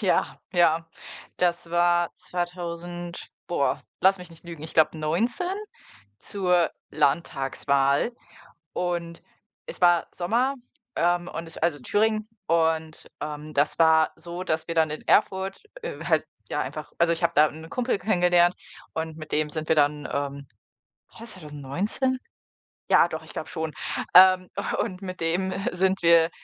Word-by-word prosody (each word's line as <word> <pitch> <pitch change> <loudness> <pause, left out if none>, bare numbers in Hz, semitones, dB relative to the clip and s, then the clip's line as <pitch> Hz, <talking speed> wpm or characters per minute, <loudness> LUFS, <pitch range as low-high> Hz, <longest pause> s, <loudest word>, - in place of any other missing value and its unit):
Ja, - - +1
ja. 165 -2 +3 0.5
Das 175 -1 0
war 175 0 +3
2000 175 0 -5 0.2
boah, 155 -5 0 0.2
lass 190 +1 +4
mich 180 -1 -11
nicht 165 - -16
lügen, 165 -3 -9
ich 160 - -8
glaube 160 0 +4
19 230 - 0 0.6
zur 180 - +1 0.2
Landtagswahl 140 - +1 0.6
und 170 -2 -3 0.4
es - - -8
war 175 -2 +5
Sommer, 235 +10 +1 0.4
ähm, 175 +1 +1
und 165 0 -6
es 165 - -9
also, 160 -3 +1
in - - -18
Thüringen 215 0 +1 0.2
und, 160 -1 0
ähm, 150 0 -6
das 145 +1 +1
war 160 -1 +5
so, 175 +1 -7
dass 160 -3 -1
wir 165 - -2
dann 160 -2 +3
in 155 - -6
Erfurt, 190 -2 +2 0.2
äh, - - -6
halt - - +2 0.2
ja - - -1
einfach - - -5
also, 170 0 +4
ich 165 - -3
habe 170 0 +2
da 150 +1 +6
'nen 160 +2 -11
Kumpel 250 -4 0
kennengelernt 180 -3 +3 0.4
und 160 -1 -4
mit 155 -1 -10
dem 150 0 +1
sind 155 0 -4
wir 160 - +3
dann, 145 0 +2
ähm 140 -1 -3 0.6
war - - -16
das 230 - -7
2019? 180 - -2 0.7
Ja, - - +7
doch, 160 -1 -6
ich - - -12
glaube - - -5
schon. 160 -1 -4 0.4
Ähm. 185 0 +8 0.3
Und 185 -5 -5
mit 185 -2 -7
dem 175 +3 0 0.2
sind 190 +1 +1
wir, 165 -1 +6
170 Hz, 150 wpm, -25 LUFS, 160-180 Hz, 0.7 s, Ähm